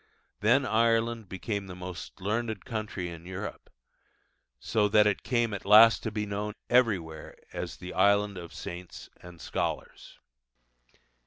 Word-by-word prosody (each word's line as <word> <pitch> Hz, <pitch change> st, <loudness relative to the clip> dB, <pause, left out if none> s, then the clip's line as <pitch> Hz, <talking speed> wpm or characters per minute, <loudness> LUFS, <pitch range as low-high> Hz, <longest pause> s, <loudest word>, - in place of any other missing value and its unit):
Then 125 Hz, +6 st, +3 dB
Ireland 115 Hz, -1 st, +1 dB
became 100 Hz, +1 st, -4 dB
the 90 Hz, -, -8 dB
most 90 Hz, -3 st, -8 dB
learned 110 Hz, +1 st, -2 dB
country 105 Hz, -6 st, -4 dB
in 85 Hz, 0 st, -10 dB
Europe, 95 Hz, +3 st, -7 dB, 0.9 s
so 105 Hz, -, +1 dB
that 105 Hz, 0 st, +5 dB
it 105 Hz, -1 st, +1 dB
came 120 Hz, -3 st, 0 dB
at 100 Hz, -, -5 dB
last 110 Hz, +3 st, +7 dB
to 110 Hz, -, -2 dB
be 105 Hz, 0 st, -2 dB
known 105 Hz, +1 st, -4 dB, 0.2 s
everywhere 95 Hz, -11 st, +1 dB, 0.2 s
as -, -, -5 dB
'The 90 Hz, +1 st, -8 dB
Island 100 Hz, +1 st, +3 dB
of 85 Hz, -2 st, -8 dB
Saints 90 Hz, +1 st, -8 dB
and 90 Hz, -1 st, -12 dB
Scholars. -, -, -4 dB
105 Hz, 140 wpm, -29 LUFS, 90-110 Hz, 0.9 s, last